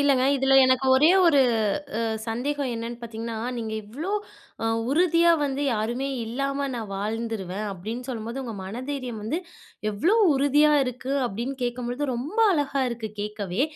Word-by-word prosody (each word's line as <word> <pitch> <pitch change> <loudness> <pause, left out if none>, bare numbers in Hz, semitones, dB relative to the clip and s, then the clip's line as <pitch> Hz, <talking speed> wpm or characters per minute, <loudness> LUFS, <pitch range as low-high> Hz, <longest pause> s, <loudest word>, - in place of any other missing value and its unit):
இல்லங்க. 275 -2 +3
இதில 270 0 +3
எனக்கு 260 0 +3
ஒரே 300 +4 +6 0.2
ஒரு 310 -4 +5 0.6
அ - - 0 0.3
சந்தேகம் 275 +4 -1
என்னன்னு 230 +1 -5
பார்த்தீங்கன்னா, 230 -1 -5 0.2
நீங்க 220 -2 -4
இவ்ளோ 300 - -5 0.5
அ - - +1 0.2
உறுதியா 340 +2 +4
வந்து, 280 0 -2
"யாருமே 240 +5 -1 0.2
இல்லாம 275 +4 -2
நான் 220 -4 -5
வாழ்ந்துருவேன்." 215 -2 -3
அப்பிடின்னு 220 +7 -6
சொல்லும்போது, 235 +1 -4
உங்க 230 -4 -6
மன 215 +7 -6
தைரியம் 255 -5 -4
வந்து 235 +10 -1 0.5
எவ்ளோ 315 - +2 0.2
உறுதியா 290 +2 +4
இருக்கு? 255 +2 -4
அப்பிடின்னு 240 +6 -4
கேட்கும்பொழுது 245 +3 -2
ரொம்ப 285 - -5
அழகா 285 -4 0
இருக்கு, 230 -3 -5
கேட்கவே. 210 +1 -2
245 Hz, 145 wpm, -25 LUFS, 225-275 Hz, 0.6 s, ஒரே